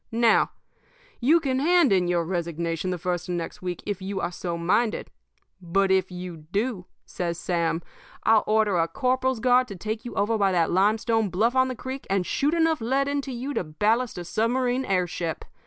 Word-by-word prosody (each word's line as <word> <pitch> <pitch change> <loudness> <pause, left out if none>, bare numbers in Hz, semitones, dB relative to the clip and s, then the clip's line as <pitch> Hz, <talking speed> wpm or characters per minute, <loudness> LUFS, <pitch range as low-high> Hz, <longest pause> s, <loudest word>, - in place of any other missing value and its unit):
Now, 230 0 +4 0.7
you 300 +8 +4
can 265 -4 -1
hand 335 - +4
in 180 -2 +2
your 175 -1 +1
resignation 170 0 -2
the 180 - -1
first 175 +1 -3
of 175 - -1
next 170 -1 -5
week 180 -1 -4
if 205 -2 -3
you 195 +1 -3
are 175 - -2
so 170 -1 -4
minded. 200 +7 0 0.5
But 190 +3 +1
if 190 -1 +2
you 180 -4 -8
do,' 205 -3 -2 0.2
says 170 -2 -3
Sam, 170 -2 -1 0.4
'I'll 220 -1 +4
order 215 -4 +2
a 165 - +2
corporal's 255 +2 0
guard 250 +1 +4
to 200 - -7
take 215 +5 -4
you 240 - -7
over 215 +2 +1
by 195 -1 +3
that 170 -2 +2
limestone 215 +3 +2
bluff 220 +7 +1
on 260 0 +4
the 255 - -4
creek 260 +2 -7
and 195 -2 +1
shoot 295 - +1
enough 325 -4 +2
lead 265 +4 +1
into 280 -1 -2
you 255 +4 -4
to - - -1
ballast 215 +10 0
a 175 - -5
submarine 245 +6 0
air 185 -4 +1
ship. 170 -2 -4
205 Hz, 195 wpm, -25 LUFS, 175-250 Hz, 0.7 s, Now